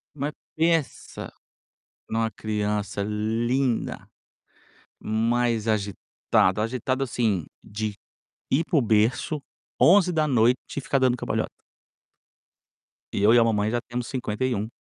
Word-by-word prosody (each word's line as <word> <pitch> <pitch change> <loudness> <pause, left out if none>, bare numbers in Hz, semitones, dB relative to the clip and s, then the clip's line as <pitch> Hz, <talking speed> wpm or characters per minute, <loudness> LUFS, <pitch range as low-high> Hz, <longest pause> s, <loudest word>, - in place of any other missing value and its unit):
mas 145 +1 -2 0.2
pensa, 165 -2 -1 0.8
numa 110 0 0
criança 105 -2 -2
linda, 115 +4 -1 0.9
mas 115 +1 +1
agitada, 100 -1 0
agitada, 130 +4 -1
assim, 110 - 0 0.2
de 105 0 -4 0.5
ir 140 +5 +2
para 165 - +1
o 140 - +5
berço, 115 +7 +1 0.4
23:00 155 - +4 0.2
e 140 - 0
ficar 135 - 0
dando 130 -2 +2
cambalhota. - - -2 1.6
E - - -1
eu 105 - +6
e - - +7
a - - +6
mamãe 105 -2 +1
já 120 - +1
temos 120 0 -3
51. 120 -3 -2
115 Hz, 110 wpm, -25 LUFS, 105-130 Hz, 1.6 s, e